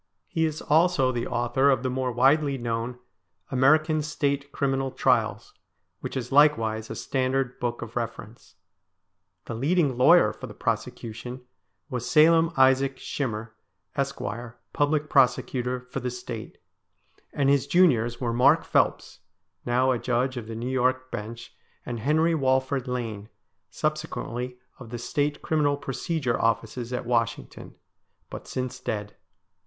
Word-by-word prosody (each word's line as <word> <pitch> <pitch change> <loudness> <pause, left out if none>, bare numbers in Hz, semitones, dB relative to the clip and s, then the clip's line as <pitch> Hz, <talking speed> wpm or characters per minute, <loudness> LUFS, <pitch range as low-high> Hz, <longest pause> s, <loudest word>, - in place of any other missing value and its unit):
He 160 -1 0
is 155 -1 -3
also 155 -4 +3
the 120 -2 -3
author 120 +3 +1
of 130 -2 +2
the 130 - 0
more 130 0 -1
widely 135 +3 +3
known 120 0 -3 0.3
' 90 +1 -38
American 155 +4 +3
State 140 -2 -2
Criminal 135 -1 0
Trials,' - - 0 0.5
which - - -5
is 125 0 -5
likewise 115 -7 +3
a - - -5
standard 130 -1 -1
book 120 -1 -2
of 115 0 -10
reference. 115 -1 -6 0.9
The - - -5
leading 140 +2 +1
lawyer 125 - +6
for - - -9
the - - -11
prosecution 120 +3 -4 0.5
was 125 -1 -4
Salim 165 +4 +5
Isaac 130 0 +4
Shinier, 110 -5 -4 0.4
Esq., 140 0 -2 0.5
Public 150 +1 +1
Prosecutor 125 -2 +2
for - - -3
the 125 - -3
State; 120 -3 -7 0.7
and 140 -2 0
his 140 0 +3
juniors 125 -9 +3
were 120 -2 -1
Mark 125 +2 +4
Phelps, - - 0 0.5
now 125 +2 +3
a 125 - 0
Judge 125 +2 0
of 120 -3 -6
the 115 - -6
New 120 +3 -3
York 130 0 0
Bench, 115 +3 -7 0.3
and 120 -2 -4
Henry 160 +7 +2
Walford 130 -2 +1
Lane, 115 -4 -4 0.4
subsequently 125 -5 -3 0.2
of 120 -3 -10
the 120 - -5
State 145 +5 -2
Criminal 145 -2 +1
Procedure 135 -1 -2
Offices 115 +2 -1
at 125 -1 -3
Washington, 115 -1 -2 0.6
but - - -8
since 130 -1 -4
dead. 105 -1 -4
130 Hz, 140 wpm, -26 LUFS, 120-140 Hz, 0.9 s, lawyer